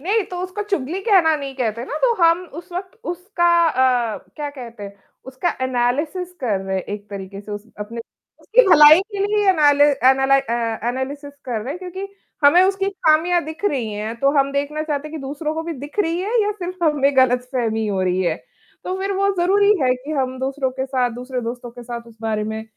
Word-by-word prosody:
नहीं 410 Hz, +8 st, +1 dB
तो 360 Hz, -, -5 dB
उसको 370 Hz, +3 st, -4 dB
चुगली 335 Hz, 0 st, -1 dB
कहना 365 Hz, -8 st, +4 dB
नहीं 275 Hz, -2 st, -6 dB
कहते 235 Hz, -2 st, -2 dB
ना, 290 Hz, -, -5 dB
तो 480 Hz, +8 st, +3 dB
हम 335 Hz, +2 st, +4 dB
उस 340 Hz, +2 st, -11 dB
वक़्त 365 Hz, +3 st, -6 dB
उसका 355 Hz, -1 st, -3 dB, 0.2 s
अ, 250 Hz, -5 st, +1 dB, 0.2 s
क्या 295 Hz, -2 st, -3 dB
कहते 240 Hz, -6 st, -10 dB
हैं, 200 Hz, 0 st, -8 dB, 0.3 s
उसका 265 Hz, +7 st, -2 dB
एनालिसिस 270 Hz, +9 st, -1 dB
कर 220 Hz, -7 st, 0 dB
रहे 190 Hz, 0 st, -3 dB
हैं 185 Hz, -, -2 dB
एक 205 Hz, +2 st, -7 dB
तरीके 195 Hz, 0 st, -7 dB
से 205 Hz, -, -12 dB
उस 205 Hz, +1 st, -7 dB
अपने 220 Hz, +3 st, -6 dB, 0.4 s
उसकी -, -, +4 dB
भलाई 300 Hz, -1 st, +9 dB
के 405 Hz, -, -4 dB
लिए 415 Hz, -1 st, +1 dB
एनालिस 290 Hz, -4 st, +4 dB
एनालाइ 270 Hz, +1 st, +5 dB
अ, 235 Hz, -3 st, -2 dB
एनालिसिस 280 Hz, +3 st, -4 dB
कर 235 Hz, -4 st, -3 dB
रहे 230 Hz, -, -7 dB
हैं 355 Hz, -, -7 dB
क्योंकि 375 Hz, +1 st, -6 dB, 0.4 s
हमें 340 Hz, +6 st, +7 dB
उसकी 390 Hz, +1 st, +1 dB
खामियाँ 345 Hz, -1 st, +2 dB
दिख 315 Hz, +5 st, -8 dB
रही 255 Hz, -, 0 dB
हैं, 210 Hz, +2 st, -4 dB
तो 275 Hz, -, +4 dB
हम 275 Hz, 0 st, +2 dB
देखना 285 Hz, +2 st, -2 dB
चाहते 300 Hz, -1 st, -3 dB
हैं -, -, -14 dB
कि -, -, -6 dB
दूसरों 300 Hz, +3 st, -4 dB
को 320 Hz, -, -3 dB
भी 335 Hz, +1 st, -4 dB
दिख 290 Hz, +8 st, -10 dB
रही 335 Hz, -2 st, 0 dB
हैं 435 Hz, +6 st, 0 dB
या 415 Hz, -, 0 dB
सिर्फ़ 365 Hz, -3 st, -5 dB
हमें 285 Hz, -3 st, +2 dB
गलतफ़हमी 250 Hz, -3 st, +1 dB
हो 200 Hz, -2 st, -1 dB
रही 185 Hz, 0 st, +1 dB
है, 170 Hz, -3 st, 0 dB, 0.5 s
तो 370 Hz, -, -2 dB
फ़िर 390 Hz, +1 st, -2 dB
वो 395 Hz, +1 st, +2 dB
ज़रूरी 400 Hz, +4 st, +4 dB
है 255 Hz, -1 st, +3 dB
कि 255 Hz, +4 st, -9 dB
हम 260 Hz, -3 st, -1 dB
दूसरों 265 Hz, 0 st, -1 dB
के 265 Hz, +1 st, -4 dB
साथ 255 Hz, -2 st, 0 dB
दूसरे 250 Hz, +1 st, -4 dB
दोस्तों 240 Hz, +1 st, -6 dB
के 245 Hz, +1 st, -11 dB
साथ 235 Hz, -1 st, -7 dB
उस 225 Hz, -, -17 dB
बारे 215 Hz, -1 st, -1 dB
में 220 Hz, +1 st, -4 dB
275 Hz, 215 wpm, -21 LUFS, 240-345 Hz, 0.5 s, भलाई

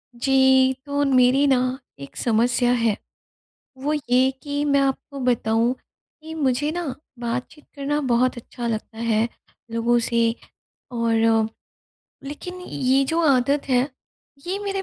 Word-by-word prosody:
जी, 265 Hz, +1 st, +4 dB
तो 285 Hz, 0 st, 0 dB
मेरी 260 Hz, +1 st, +4 dB
न 255 Hz, -1 st, +2 dB, 0.2 s
एक 140 Hz, -, -10 dB
समस्या 240 Hz, +1 st, +2 dB
है। 230 Hz, -3 st, +1 dB, 0.8 s
वो 285 Hz, +3 st, -1 dB
ये 260 Hz, -2 st, +2 dB
कि 285 Hz, 0 st, -2 dB
मैं 280 Hz, -1 st, +3 dB
आपको 275 Hz, +1 st, -2 dB
बताऊँ 235 Hz, -1 st, +1 dB, 0.5 s
कि 320 Hz, +1 st, -8 dB
मुझे 290 Hz, -1 st, 0 dB
न 340 Hz, -7 st, -3 dB, 0.3 s
बातचीत 245 Hz, +5 st, -5 dB
करना 285 Hz, +1 st, -1 dB
बहुत 250 Hz, +1 st, +2 dB
अच्छा 240 Hz, 0 st, -6 dB
लगता 220 Hz, 0 st, -4 dB
है 225 Hz, -1 st, +1 dB, 0.4 s
लोगों 230 Hz, +1 st, +2 dB
से 230 Hz, -1 st, +1 dB, 0.6 s
और 225 Hz, -2 st, +2 dB, 0.8 s
लेकिन 360 Hz, +6 st, -7 dB
ये 270 Hz, -5 st, +1 dB
जो 325 Hz, +5 st, 0 dB
आदत 275 Hz, +2 st, +2 dB
है 255 Hz, +1 st, +2 dB, 0.6 s
ये 375 Hz, +3 st, -2 dB
मेरे 395 Hz, -1 st, -3 dB
255 Hz, 130 wpm, -23 LUFS, 235-285 Hz, 0.8 s, जी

